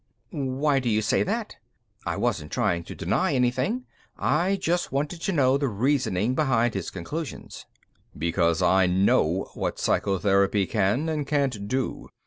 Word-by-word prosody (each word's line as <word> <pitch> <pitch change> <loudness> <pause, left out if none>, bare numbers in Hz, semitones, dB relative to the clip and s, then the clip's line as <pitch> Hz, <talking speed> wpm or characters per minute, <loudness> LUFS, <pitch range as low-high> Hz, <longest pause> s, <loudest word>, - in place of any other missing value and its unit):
"Why 140 -2 0
do 125 -2 -1
you 110 0 +1
say 105 - +2
that?" 220 +3 -2 0.5
I 85 - -1
wasn't 100 -11 -1
trying 85 0 0
to - - -8
deny 170 -7 0
anything; 130 - 0 0.3
I 180 +6 +1
just 175 -2 -1
wanted 145 +5 -2
to 195 - -1
know 135 -5 +3
the 140 - 0
reasoning 120 -2 0
behind 120 -5 +1
his 95 -4 -3
conclusions. 145 - -7 0.5
"Because 85 +1 +1
I 95 +1 +4
know 90 -1 +2
what - - -3
psychotherapy 100 0 +2
can 105 - 0
and 150 -3 -2
can't 135 -9 -1
do. 130 +2 -3
125 Hz, 145 wpm, -25 LUFS, 95-150 Hz, 0.5 s, I